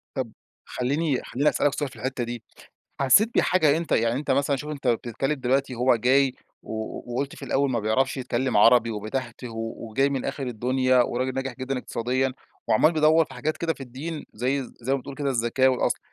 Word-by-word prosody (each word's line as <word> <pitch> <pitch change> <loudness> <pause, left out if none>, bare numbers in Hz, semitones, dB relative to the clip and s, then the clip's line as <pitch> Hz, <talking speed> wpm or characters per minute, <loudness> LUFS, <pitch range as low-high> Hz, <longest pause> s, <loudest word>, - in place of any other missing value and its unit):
طَب 125 -4 -3 0.3
خليني 140 +2 -1
خليني 145 +4 +1
أسألك 145 -1 +1
سؤال 145 -2 -2
في - - -16
الحتّة 130 -1 -3
دي، 120 -1 -5 0.6
حسيت 200 - +5
بحاجة 160 -5 +3
أنت 165 0 -3
يعني 115 +2 +2
أنت 145 -2 -4
مثلًا 140 +1 +2
شوف 150 +3 -6
أنت 140 -3 -6
بتتكلّم 120 +4 0
دلوقتي 135 0 0
هو 125 0 +3
جاي 130 +3 +3 0.3
و 110 0 -5
وقُلت 140 +3 -2
في - - -8
الأول 140 0 +1
ما 115 -3 0
بيعرفش 110 +7 +1
يتكلّم 125 -2 -1
عربي، 115 +2 +6
وبيتهتِه 120 +3 -5
وجاي 115 +3 -1
من 135 -2 -2
آخر 135 -1 -3
الدنيا، 125 +2 +2
وراجل 130 +2 -2
ناجح 135 -1 -3
جدًا 130 +1 -3
اقتصاديًا، 130 +2 -1 0.4
وعمّال 155 +9 +4
بيدوّر 155 +1 +4
في - - -13
حاجات 155 +1 -2
كده 165 -1 -1
في - - -21
الدين، 145 +6 -6
زي 130 +5 0 0.2
زي 130 +4 0
ما - - 0
بتقول 140 +2 -9
كده 140 -1 -1
الزكاة 125 +2 +2
والأصل، 130 - +1
130 Hz, 190 wpm, -25 LUFS, 120-140 Hz, 0.6 s, عربي